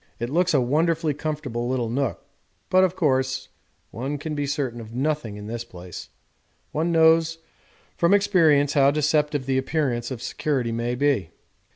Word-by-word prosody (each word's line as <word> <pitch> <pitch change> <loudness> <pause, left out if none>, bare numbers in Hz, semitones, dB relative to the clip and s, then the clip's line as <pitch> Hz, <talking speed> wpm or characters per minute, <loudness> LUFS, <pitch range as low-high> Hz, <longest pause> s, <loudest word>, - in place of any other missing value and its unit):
It 120 +2 -3
looks 175 +1 +2
a - - +5
wonderfully 160 +4 +1
comfortable 140 -5 -3
little 125 -2 0
nook, 125 0 -2 0.5
but, 185 0 +5
of 185 -1 +1
course, 130 -5 0 0.4
one 135 +5 -4
can 150 +2 -5
be 145 -1 -2
certain 135 -5 -2
of 115 +1 -10
nothing 135 -6 -1
in 105 - -8
this 115 +2 -4
place; 90 -5 -10 0.6
one 165 +3 0
knows 165 0 +4 0.6
from 170 - +3
experience 160 -8 +4
how 140 -2 +5
deceptive 150 -1 +1
the 130 0 +1
appearance 130 -4 -1
of 130 -3 -5
security 130 -6 -1
may 120 +2 -2
be. 130 - +1
140 Hz, 160 wpm, -24 LUFS, 120-155 Hz, 0.6 s, a